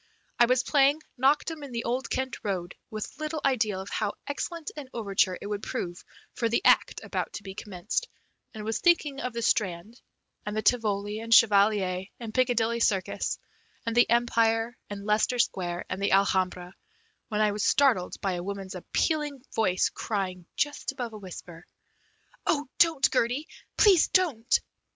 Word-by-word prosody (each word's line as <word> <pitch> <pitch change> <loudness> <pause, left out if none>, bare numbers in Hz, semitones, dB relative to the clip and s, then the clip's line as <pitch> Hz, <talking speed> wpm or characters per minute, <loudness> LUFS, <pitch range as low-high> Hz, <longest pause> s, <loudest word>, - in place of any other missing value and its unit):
I 240 - +7
was 255 +1 +3
playing 285 +2 +3 0.2
"Knocked 275 +5 +2
'em 320 -2 -8
in 280 -3 -8
the 235 0 -2
Old 250 +3 -2
Kent 260 -1 -2
Road" 180 -4 -3 0.2
with 215 -1 -6
little 310 0 -3
idea 220 -7 +1
of 190 +1 -7
how 210 -2 -1
excellent 320 +3 -4
an 290 -4 -8
overture 195 -4 +1
it - - -9
would 205 0 -3
prove 180 -9 -5 0.3
for 230 - -1
the 235 - 0
act - - +4
about - - -3
to 205 - -7
be 190 0 -7
commenced, 205 - -3 0.4
and 215 -2 -8
was 225 0 -1
thinking 310 -5 +2
of 250 - -3
the 235 0 -3
Strand, 205 +2 -1 0.4
and 210 +1 -4
the 215 - -1
Tivoli, 210 -3 +1
and 230 +1 -7
Chevalier, 200 -4 +4
and 225 -2 -7
Piccadilly 235 -2 +2
Circus, 195 -5 0 0.5
and 230 0 -2
the 240 - +5
Empire, 230 0 +2
and 200 0 -7
Leicester 215 +4 +2
Square, 180 -6 -1
and 185 +1 -4
the 200 - +1
Alhambra, 185 -2 +1 0.5
when 210 -2 -2
I 210 -1 +3
was 205 0 -2
startled 255 -11 +2
by 195 - 0
a 175 -1 -4
woman's 195 0 -5
appealing 290 - -1
voice 185 -5 +2
crying 185 -5 -3
just 290 -1 -1
above 245 -4 -5
a 215 - -8
whisper: 175 -3 -10 0.8
"Oh, 295 -2 +2
don't, 325 -5 +5
Gertie; 255 +5 +1 0.3
please 390 -6 +6
don't!" 280 -11 +2
225 Hz, 170 wpm, -27 LUFS, 195-260 Hz, 0.8 s, I